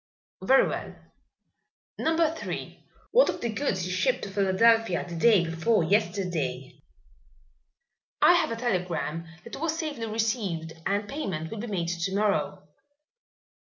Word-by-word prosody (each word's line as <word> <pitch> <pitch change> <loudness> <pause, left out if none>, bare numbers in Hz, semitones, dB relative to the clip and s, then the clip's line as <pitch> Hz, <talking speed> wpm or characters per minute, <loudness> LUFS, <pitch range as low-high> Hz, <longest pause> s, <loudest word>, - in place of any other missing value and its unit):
"Very 265 +8 +5
well. - - -5 1.0
Number 320 0 +2
Three, 330 - -7 0.2
what - - +5
of - - -3
the 235 - -2
goods 210 -6 -1
you 180 - -4
shipped 250 +8 +1
to 200 - -5
Philadelphia 200 0 +3
day 175 +2 +3
before 170 +5 +1
yesterday?" 165 - -1 1.4
"I - - +7
have - - +2
a 230 - -2
telegram 175 - -2 0.2
that - - -8
it - - -9
was 325 -1 -1
safely 290 -9 -4
received 215 -7 -2
and 205 +1 -1
payment 190 - -4
will 225 - -5
be 235 - -5
made 175 -6 -2
to 175 +2 -2
morrow." 195 -4 0
200 Hz, 135 wpm, -27 LUFS, 170-230 Hz, 1.4 s, I